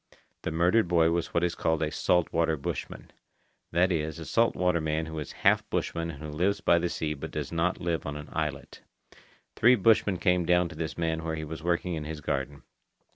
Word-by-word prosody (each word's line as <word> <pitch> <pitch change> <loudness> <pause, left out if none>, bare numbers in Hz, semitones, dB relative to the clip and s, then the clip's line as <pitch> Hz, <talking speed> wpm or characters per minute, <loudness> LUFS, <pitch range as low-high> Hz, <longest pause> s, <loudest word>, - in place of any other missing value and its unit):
The - - -3
murdered 90 +6 +3
boy 85 -2 +3
was 85 0 -1
what 85 - +1
is 90 -1 +1
called 80 -2 0
a 75 - -1
salt 90 +1 +1
water 80 -1 +2
bushman—that 85 +5 -4
is, 80 -1 -1
a 80 - -7
salt 115 +6 +2
water 90 -2 +1
man 80 +1 -1
who 80 0 -6
is 75 - -6
half - - +4
bushman 85 0 -2
and 75 -2 -8
who 75 - -6
lives 90 +7 0
by 85 - +4
the 85 +1 -1
sea 75 -2 -2
but 70 - -7
does - - -5
not 85 +2 0
live 85 -3 -2
on 75 0 -4
an 75 - -9
islet. - - -4 0.7
Three 125 +3 +6
bushmen 105 -3 +3
came 90 -2 +2
down 90 0 +2
to 80 - -10
this 80 0 -4
man 80 -1 -1
where 80 0 -2
he 80 0 -5
was 80 +1 -7
working 85 +1 0
in 80 -2 -4
his 80 0 -5
garden. 70 -1 -3
85 Hz, 215 wpm, -28 LUFS, 80-90 Hz, 0.7 s, Three